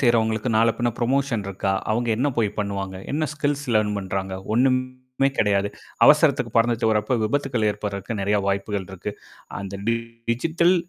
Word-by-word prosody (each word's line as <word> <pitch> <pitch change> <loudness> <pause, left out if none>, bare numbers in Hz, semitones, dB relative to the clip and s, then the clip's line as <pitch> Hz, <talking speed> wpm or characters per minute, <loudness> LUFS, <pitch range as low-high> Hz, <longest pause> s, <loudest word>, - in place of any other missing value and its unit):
செய்றவங்களுக்கு 115 -2 +2
நாளை 115 +1 +4
பின்ன 120 0 +1
புரமோஷன் 125 -3 0
இருக்கா? 95 0 -1 0.2
அவங்க 120 +2 0
என்ன 130 +6 +1
போய் 110 -3 +2
பண்ணுவாங்க? 100 -2 -3 0.2
என்ன 155 +2 0
ஸ்கில்ஸ் 145 -1 -1
லேர்ன் 105 -1 +2
பண்றாங்க? 95 0 -3 0.2
ஒண்ணும்மே 130 +1 +1
கெடையாது. 100 -1 +2 0.4
அவசரத்துக்கு - - +4
பறந்துட்டு 115 -1 +3
வர்றப்ப 105 +3 +1
விபத்துக்கள் 125 -2 0
ஏற்படுர்றதுக்கு 105 +1 -4
நெறைய 100 +1 +2
வாய்ப்புகள் 100 0 -2
இருக்கு. 95 +2 -5 0.5
அந்த 100 0 -6
டி 115 - +3 0.4
டிஜிட்டல் 165 +8 +2
110 Hz, 145 wpm, -23 LUFS, 100-130 Hz, 0.5 s, நாளை